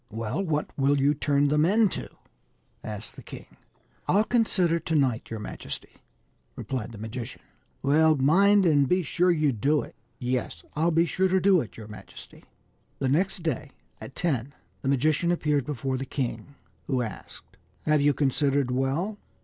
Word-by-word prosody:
" - - -42
Well, 125 - -2
what 150 -4 -2
will 140 +1 +3
you 140 +2 +3
turn 145 -1 +1
them 150 +1 +3
into 205 +4 +2 0.4
?" - - -42 0.3
asked 110 0 -7
the - - -10
king. - - -10 0.3
" - - -38
I'll 205 +3 +4
consider 205 -7 +2
to 160 - -2
night, 130 -6 +1
your 115 - -5
majesty," 105 - -7 0.6
replied 125 -4 -4
the 115 - -10
magician. 110 +2 -7 0.2
" - - -41
Well, 155 +3 +4
mind 195 +8 +4
and 145 -5 +4
be 180 0 +2
sure 180 +4 +2
to 155 -4 +2
do 140 +6 +1
it." - - -11 0.2
" - - -41
Yes, 125 0 -2
I'll 160 +3 +2
be 165 0 +3
sure 190 +3 +1
to 190 +1 +2
do 185 -2 +4
it, 115 - -9
your 110 -2 -9
majesty." 105 0 -12 0.5
The 135 - -1
next 180 +5 0
day, 150 -3 -2 0.3
at 135 - -10
ten, 140 -6 -2 0.3
the 135 - -1
magician 155 +5 +2
appeared 150 -6 0
before 135 -2 -2
the 135 - -4
king, 130 0 -4 0.3
who 130 -3 0
asked: 105 -5 -10 0.2
" 90 - -38
Have 150 -1 +3
you 145 -1 +3
considered 140 -1 +1
well 145 +11 -1
145 Hz, 180 wpm, -26 LUFS, 130-170 Hz, 0.6 s, I'll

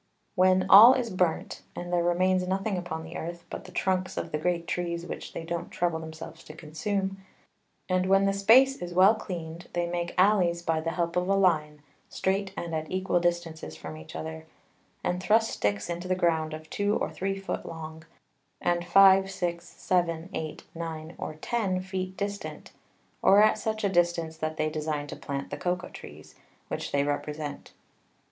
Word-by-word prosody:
When 185 -1 +4
all 225 +7 +10
is 245 -3 -2
burnt, 180 -3 -1
and 175 0 -5
there 175 -1 +3
remains 180 +1 +2
nothing 195 +2 -1
upon 170 -3 -4
the 160 +1 -9
Earth, 170 +1 -6
but - - -6
the 185 - -11
Trunks 185 0 -1
of - - -3
the 150 - -1
great 170 +1 0
Trees 170 -1 -3
which - - -7
they - - -5
don't 170 +1 -4
trouble 170 -2 -1
themselves 160 0 -9
to 155 - -10
consume, 190 +5 -3 0.7
and 185 0 +1
when 195 +1 +4
the 195 - +2
Space 250 +7 +5
is 175 0 -5
well 190 +4 +7
cleaned, 170 -5 -7
they 175 0 0
make 175 0 -3
Alleys 180 -3 +3
by 165 -1 0
the 165 - -2
help 170 0 -2
of 180 +1 0
a 195 - +4
Line, 155 -6 +1 0.3
strait 195 +1 -1
and 170 -1 -4
at 155 -1 -3
equal 185 -1 +1
Distances 170 - -2
from 80 0 -8
each 80 0 -11
other, 80 0 -6 0.6
and 180 0 -1
thrust 220 +3 +3
Sticks 100 0 -1
into 175 +1 -4
the 185 - +1
Ground 160 -3 +1
of 155 0 -11
two 205 +1 +1
or - - -2
three 195 +1 -2
Foot 195 - -4
long, 160 -1 -8 0.6
and 175 0 0
5, 190 +2 +6
6, 175 -2 -3
7, 170 -2 -1
8, 155 -1 -5
9 165 0 -6
or 155 - -5
10 190 +2 -1
Feet 185 0 -4
distant, 200 0 -5 0.5
or 205 +2 +7
at 215 0 +3
such 220 0 -2
a - - +4
distance 175 -3 +1
that 155 0 -3
they 155 - +1
design 150 -1 -2
to 145 - -7
plant 140 -1 -5
the - - -3
Cocao 180 0 -2
Trees, - - -11 0.4
which - - -4
they 140 0 +2
represent. 145 +1 -4
175 Hz, 185 wpm, -28 LUFS, 160-190 Hz, 0.7 s, all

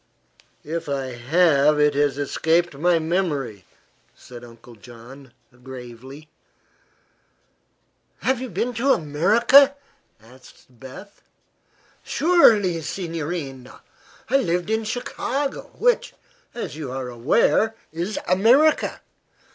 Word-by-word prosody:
"If 160 0 -5
I 135 -2 -3
have 150 +3 +2
it 150 0 +3
has 145 -1 0
escaped 160 +4 0
my 170 +5 +2
memory," 155 - -2 0.5
said 120 -1 -13
Uncle 120 0 -15
John, 120 +4 -14 0.3
gravely. 130 +3 -11 2.0
"Have 260 -1 0
you 260 - -5
been 225 +6 -2
to 260 +4 +2
America?" 215 - +4 0.4
asked 125 +4 -19
Beth. 185 - -12 0.8
"Surely, 215 - +3
signorina. 160 -6 -6 0.5
I 275 - +3
lived 180 -5 -1
in 220 0 -1
Chicago, 260 +4 -4
which, - - +1 0.4
as 235 - -6
you 150 -5 -6
are 130 -1 -5
aware, 155 - +1 0.2
is 175 +6 -4
America. 250 +12 +3
160 Hz, 100 wpm, -22 LUFS, 135-215 Hz, 2.0 s, America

